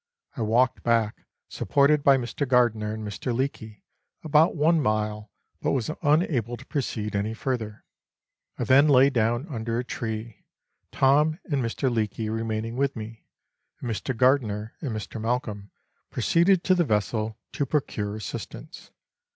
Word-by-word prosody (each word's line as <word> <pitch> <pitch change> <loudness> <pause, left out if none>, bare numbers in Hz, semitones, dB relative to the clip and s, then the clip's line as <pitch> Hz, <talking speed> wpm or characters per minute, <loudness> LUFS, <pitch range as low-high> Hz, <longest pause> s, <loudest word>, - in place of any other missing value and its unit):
I 120 - -4
walked 115 +3 +2
back, 115 -2 0 0.2
supported 145 +1 +2
by 140 -1 +6
Mr. 125 +3 -3
Gardiner 120 -4 +2
and 110 -1 -5
Mr. 105 +5 -4
Leake, 110 -5 -4 0.4
about 155 +1 +4
one 160 +1 +3
mile, 105 -2 -1 0.3
but - - 0
was 130 +1 -1
unable 145 - +1
to 130 - -13
proceed 110 -8 -3
any 105 +3 -1
further. 115 -4 -4 0.7
I - - -2
then 140 +3 +5
lay 135 -1 +6
down 120 +1 +1
under 115 -5 -3
a 125 - -1
tree, 110 -2 -5 0.5
Tom 150 +4 +3
and 145 -6 -1
Mr. 115 +4 -1
Leake 110 -3 -1
remaining 115 +1 -3
with 140 0 0
me, 110 0 -9 0.5
and 120 - -4
Mr. 115 +3 -3
Gardiner 115 -4 +2
and 145 - -3
Mr. 110 0 -5
Malcolm 110 -3 -2 0.4
proceeded 175 +2 +3
to 185 - +4
the 180 -1 +3
vessel, 110 - -1
to 140 - -2
procure 105 -8 -2
assistance. 110 -3 -8
120 Hz, 145 wpm, -26 LUFS, 110-140 Hz, 0.7 s, by